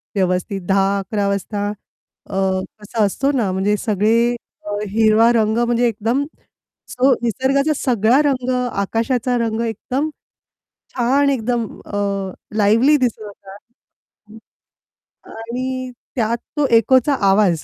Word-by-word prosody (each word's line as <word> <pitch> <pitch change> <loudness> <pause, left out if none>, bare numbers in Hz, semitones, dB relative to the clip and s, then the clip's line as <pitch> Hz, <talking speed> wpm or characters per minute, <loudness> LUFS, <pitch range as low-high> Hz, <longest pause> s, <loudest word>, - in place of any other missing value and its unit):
व्यवस्थित 185 +1 -1
10:00-11:00 200 +1 +1
वाजता 200 +1 -2
अ, 205 -1 -14 0.5
कसा 215 +1 -2
असतो 270 +8 0
ना, 235 -9 0
म्हणजे 190 +3 +1
सगळे 215 0 +1 0.5
अ, 210 - -6 0.2
हिरवा 220 +2 +4
रंग 220 -1 +2
म्हणजे 240 0 +2
एकदम 230 +5 -1 0.6
जो 260 +1 +3
निसर्गाचा 270 +6 +1
सगळा 240 +2 +3
रंग, 255 -2 -2 0.2
आकाशाचा 240 +5 -1
रंग 230 -1 -1
एकदम 255 +7 -2 0.9
छान, 270 +3 +2
एकदम 240 -3 0 0.2
अ, 205 - -5 0.6
लिव्हली 230 +9 +4
दिसत 250 -5 -1
होता. 200 -1 -11 1.7
आणि 255 +3 -5 0.2
त्यात 230 -2 0 0.2
तो 295 - +3
एकोचा 260 +5 +3 0.2
आवाज 195 -5 +3
225 Hz, 110 wpm, -19 LUFS, 205-255 Hz, 1.7 s, हिरवा